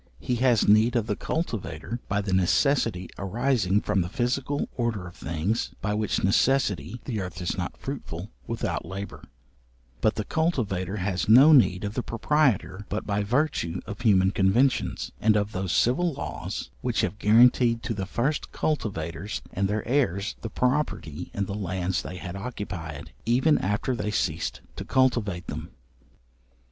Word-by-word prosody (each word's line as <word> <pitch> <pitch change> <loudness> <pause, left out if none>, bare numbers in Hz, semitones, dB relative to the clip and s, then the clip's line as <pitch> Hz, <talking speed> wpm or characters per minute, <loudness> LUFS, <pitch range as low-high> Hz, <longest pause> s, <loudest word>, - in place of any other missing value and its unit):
He 125 +8 -1
has 125 -3 +3
need 110 +4 +5
of 115 -3 +2
the 105 -2 -1
cultivator 115 - -3
by 100 0 +1
the 100 -2 -2
necessity 95 - +2
arising 105 -1 +1
from 105 -2 +1
the 85 - -3
physical 130 +5 -1
order 115 -6 -1
of 85 - -10
things, 85 +8 -2
by 105 +1 -1
which 105 0 -1
necessity 100 - +2
the 110 -6 -2
earth 90 0 -6
is 90 - -2
not 90 -2 -4
fruitful 105 - -6 0.2
without 115 - -2
labour; 95 +3 -7 0.8
but 110 - +2
the 110 - -2
cultivator 105 - -1
has 95 +1 -1
no 130 +8 +9
need 95 -9 +5
of 100 0 -3
the 125 - -1
proprietor 115 -6 +1
but 105 - -3
by 105 0 0
virtue 105 - 0
of 105 -1 -7
human 95 -5 +4
conventions, 110 +8 +1
and 110 0 +4
of 105 0 -1
those 95 -3 -2
civil 170 +9 +2
laws - - -5
which - - 0
have 100 +4 -2
guaranteed 115 +1 +5
to - - -2
the 95 -3 -4
first 135 +9 -1
cultivators 100 - -3
and 95 +1 +1
their 105 +1 -2
heirs, 110 -7 +1
the 115 - -4
property 125 - -1
in 100 - 0
the 100 - -5
lands 95 -2 -1
they 90 - -7
had 90 0 -6
occupied, 95 - -6
even 130 +6 +4
after 105 +6 -1
they 105 -2 -2
ceased 105 - -1
to - - -5
cultivate 115 -9 +1
them. - - -6
105 Hz, 160 wpm, -26 LUFS, 95-125 Hz, 0.8 s, no